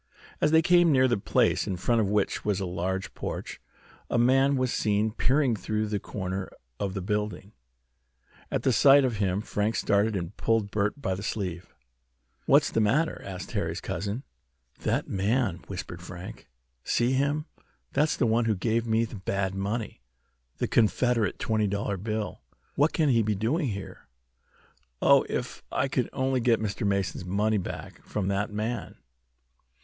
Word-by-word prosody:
As - - +4
they 160 +1 +5
came 175 -1 +5
near 130 -2 +5
the 120 - +2
place, 100 - +1
in 95 - -2
front 110 +6 +2
of 100 - 0
which 105 -1 0
was 105 -2 0
a 95 - -2
large 90 +2 -3
porch, - - -6 0.5
a - - +1
man 135 +3 +4
was 130 -1 0
seen 105 +1 +1
peering 130 +4 +2 0.2
around 110 0 0
the 105 - 0
corner 95 -1 -4 0.3
of 100 -1 -2
the 95 - -3
building. 105 -1 -2 1.0
At - - -1
the 130 - +3
sight 135 +5 +7
of 120 -4 -1
him 100 -1 0
Frank 105 +2 -1
started 105 +1 +2
and 90 +1 -4
pulled 110 -3 +1
Bert 105 +5 0
by 95 -9 -1
the 95 - -5
sleeve. 90 -7 -4 0.7
"What's - - +5
the 115 - +2
matter?" 135 +10 +1
asked 95 -2 -7
Harry's - - -2
cousin. 100 +9 -4 0.6
"That - - -1
man!" 100 -1 0
whispered 85 -3 -6
Frank. 90 +1 -9 0.3
"See 120 +1 +1
him! 140 +3 +1 0.5
That's 150 +1 +2
the 125 - +2
one 115 +1 +2
who 110 -2 +2
gave 115 +5 0
me 115 +1 +2
the 110 - -8
bad 95 0 -1
money 100 - -3 0.6
the - - -1
Confederate 115 0 +2
twenty 110 -1 0
dollar 100 0 -2
bill. 110 +2 -4 0.3
What 145 +3 +3
can 155 -3 +2
he 115 -3 +4
be 105 -1 0
doing 135 - 0
here? 100 -4 -6 0.9
Oh, - - +5
if - - -3
I - - +1
could - - -1
only 130 0 0
get 115 -2 +3
Mr. 105 -1 -2
Mason's 100 -2 -1
money 105 +4 +1
back 90 - -7
from 100 -2 -2
that 105 +2 -1
man!" 110 +3 -3
105 Hz, 165 wpm, -27 LUFS, 100-120 Hz, 1.0 s, sight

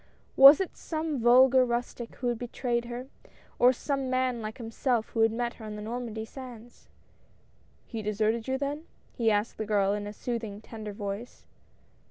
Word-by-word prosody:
Was 275 +2 +10
it 380 - -3
some 315 -3 -3
vulgar 255 +2 +6
rustic 240 -1 -3
who 250 - -3
had 240 -2 -2
betrayed 240 -1 -2
her, 240 +1 -6 0.5
or 250 +1 +7
some 270 +1 -2
man 255 -2 0
like 215 0 -6
himself 230 0 -1
who 230 - -4
had 225 0 +4
met 240 +1 -2
her - - -7
on 210 -1 -6
the 210 - -7
Normandy 225 -1 -5
sands? 240 -1 -12 1.0
"He 225 -3 -6
deserted 215 +2 0
you, 265 0 0
then?" 290 +3 -3 0.3
he 230 -2 +1
asked 210 +1 0
the 220 - -2
girl, 200 -2 +2
in 205 0 -3
a - - -5
soothing, 220 -3 -4
tender 220 -1 -8
voice. 205 +3 -6
235 Hz, 175 wpm, -28 LUFS, 220-255 Hz, 1.0 s, Was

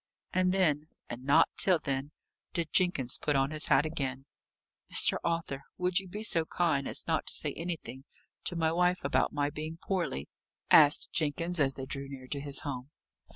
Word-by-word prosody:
And 185 0 +2
then, 155 -6 +1 0.2
and 120 +1 -7
not 140 +2 +4
till 185 -3 +4
then, 140 -1 -3 0.4
did 170 -3 -3
Jenkins 145 -9 +1
put 150 - 0
on 135 +1 +1
his 155 -1 +2
hat 145 - +4
again. 135 -4 -3 0.7
"Mr. - - +5
Arthur, 165 -5 -2 0.2
would 180 0 +1
you 195 - -8
be 210 +4 -6
so 170 -7 +2
kind 160 -4 0
as - - +3
not - - -1
to - - +1
say - - 0
anything 160 -6 -6 0.4
to 175 - 0
my 160 -1 +1
wife 180 +1 +1
about 140 - +1
my 145 -1 -1
being 155 +2 -6
poorly?" 175 - -3 0.4
asked 150 0 +6
Jenkins, 165 +3 -1
as 135 -2 +3
they 135 - -6
drew 135 +1 -6
near 135 -2 -9
to 140 - -3
his 140 0 +2
home. 130 -2 -6
150 Hz, 185 wpm, -30 LUFS, 140-175 Hz, 0.7 s, asked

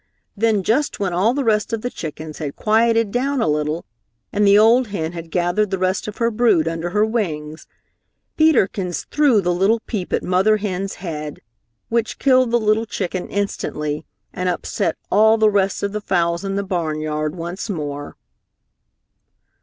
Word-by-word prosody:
Then 215 -2 +1
just 270 +10 0
when 195 -3 -1
all 205 +8 +2
the 280 - 0
rest 215 -2 +1
of 225 - -2
the 245 - -2
chickens 155 -1 -7
had 145 -3 -4
quieted 225 0 +2
down 270 +4 0
a 225 - +1
little 150 +2 -1 0.5
and 205 0 +3
the 200 +1 +7
old 230 +4 +5
hen 165 -6 -3
had 165 -1 -8
gathered 180 +4 +1
the 190 - -1
rest 185 +2 -1
of 210 - -6
her 230 0 +1
brood 215 -8 +3
under 165 +1 -2
her 210 +4 +2
wings, 160 -9 -3 0.7
Peter 315 -9 +5
Kins 180 -3 -4
threw 280 -8 +4
the 175 -1 0
little 195 +6 +2
peep 200 -7 -5
at - - 0
mother 190 +4 +3
hen's 195 -2 -3
head, 150 -3 -5 0.5
which 230 -1 -1
killed 255 -2 +3
the 240 +1 +2
little 215 +1 +1
chicken 185 -4 -4
instantly 150 -6 -3 0.3
and 180 0 -1
upset 170 -2 -2
all 220 +2 +5
the 215 -1 +4
rest 195 -1 0
of 200 - -1
the 210 +1 -4
fowls 170 -2 0
in 195 0 -2
the 200 - -1
barnyard 155 -4 -2
once 175 +5 -5
more. 145 -5 -5
195 Hz, 175 wpm, -20 LUFS, 170-220 Hz, 0.7 s, the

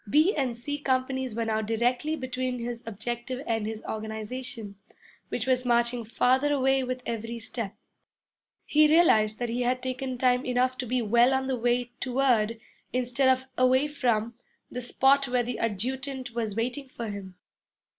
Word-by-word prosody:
B 310 - +4
and 260 -5 -1
C 290 +5 -4
companies 260 -3 -1
were 230 0 -1
now 220 -1 0
directly 245 +7 0
between 255 -2 -3
his 235 0 -4
objective 240 +4 -4
and 225 -2 -1
his 220 0 -5
organization, 220 +1 -5 0.5
which 235 - -2
was 255 -1 +2
marching 240 0 +2
farther 260 +5 +2
away 270 -1 +3
with 255 0 -4
every 230 0 -4
step. 225 -2 -4 0.9
He 305 0 +5
realized 220 -10 +4
that 240 -1 -2
he 240 +2 -1
had 250 +1 0
taken 255 0 -3
time 250 0 +3
enough 255 0 +1
to 250 - -2
be 250 +1 0
well 240 +4 +4
on 265 0 0
the 265 -1 0
way 245 0 0
toward, 245 -4 +1 0.3
instead 255 +2 +2
of 260 0 +2
away 260 +3 +4
from, 235 -6 0 0.4
the 250 - -4
spot 270 +3 +3
where 250 -1 +1
the 245 +1 -4
adjutant 255 +5 -3
was 225 -3 -2
waiting 250 +5 -2
for 235 -3 -6
him. 200 -3 -7
250 Hz, 165 wpm, -27 LUFS, 230-260 Hz, 0.9 s, He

